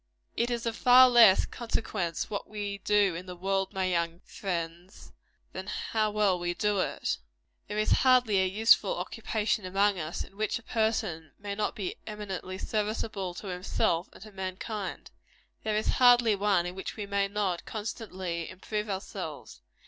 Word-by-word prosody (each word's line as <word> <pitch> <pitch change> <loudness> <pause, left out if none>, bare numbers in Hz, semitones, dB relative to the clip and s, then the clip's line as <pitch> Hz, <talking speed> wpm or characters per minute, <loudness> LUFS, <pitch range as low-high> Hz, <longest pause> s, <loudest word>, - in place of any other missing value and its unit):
It 235 +1 +1
is 235 -1 -2
of 230 -1 -1
far 255 +2 +8
less 230 -6 +7
consequence 210 -7 -3
what 205 -2 -5
we 205 -1 -4
do 205 -2 +3
in 180 +3 -7
the 180 - -7
world, 195 +1 -1
my 190 -2 -1
young 170 -1 -1
friends, 175 0 -5 0.4
than - - -6
how 215 -1 -1
well 205 -3 +2
we 175 0 -2
do 210 0 +1
it. - - -1 0.5
There 210 - -4
is 215 - +1
hardly 250 -7 +4
a 190 - +2
useful 220 - +4
occupation 215 -1 -1
among 195 +1 +2
us, 155 +1 -3
in - - -16
which 215 -1 0
a 230 - -13
person 220 -10 -1
may 200 0 -5
not 210 +1 -2
be 375 +5 -4
eminently 195 -3 -5
serviceable 210 -3 -2
to 200 - -8
himself 180 -1 0
and - - -13
to 215 - -12
mankind. 190 +2 -5 0.5
There 215 -1 -1
is 215 - -1 0.2
hardly 245 -3 +7
one 195 -3 +2
in 180 - -4
which 190 0 -6
we 210 - -4
may 200 0 0
not 195 -4 -2
constantly 190 -6 -4
improve 210 +3 -4
ourselves. 195 0 -6
200 Hz, 165 wpm, -29 LUFS, 185-215 Hz, 0.5 s, far